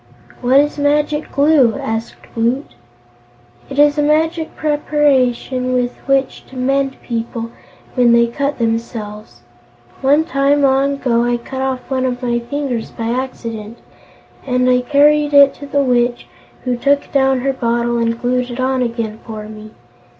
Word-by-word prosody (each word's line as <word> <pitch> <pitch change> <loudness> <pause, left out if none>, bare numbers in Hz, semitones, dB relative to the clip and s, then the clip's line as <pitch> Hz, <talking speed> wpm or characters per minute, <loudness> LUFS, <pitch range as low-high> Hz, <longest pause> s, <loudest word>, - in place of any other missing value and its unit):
"What 255 +2 +4
is 295 0 0
Magic 295 +1 0
Glue?" 280 -5 +3
asked 225 +1 -4 0.2
Woot. 235 +5 -1 1.0
"It 270 - -7
is 295 0 +4
a - - +4
magic 315 +2 0
preparation 270 -4 +1
with 245 -1 0
which 275 -1 0
to 265 - -14
mend 270 +1 0
people 230 -1 -4 0.4
when 245 -2 +4
they 235 0 +5
cut 280 +5 -2
themselves. 220 - -4 0.6
One 285 +4 +4
time, 280 -1 +1
long 275 +1 +3
ago, 240 -4 0
I 240 0 +1
cut 260 +2 -7
off 265 -1 -3
one 260 -1 -1
of 250 0 -4
my 240 -1 0
fingers 245 -1 -4
by 230 0 -5
accident, 230 -3 -5 0.7
and 250 -1 0
I 250 0 +3
carried 295 +2 +3
it 280 -1 +7
to 285 - -9
the 280 0 +1
Witch, 240 -1 +1 0.4
who 250 -1 -1
took 280 +3 +1
down 265 -2 +2
her 270 +1 0
bottle 235 -1 0
and 230 0 -1
glued 250 0 -1
it 240 +1 -7
on 260 0 0
again 230 -2 -3
for 215 -2 -7
me. 215 0 -10
255 Hz, 155 wpm, -17 LUFS, 235-280 Hz, 1.0 s, it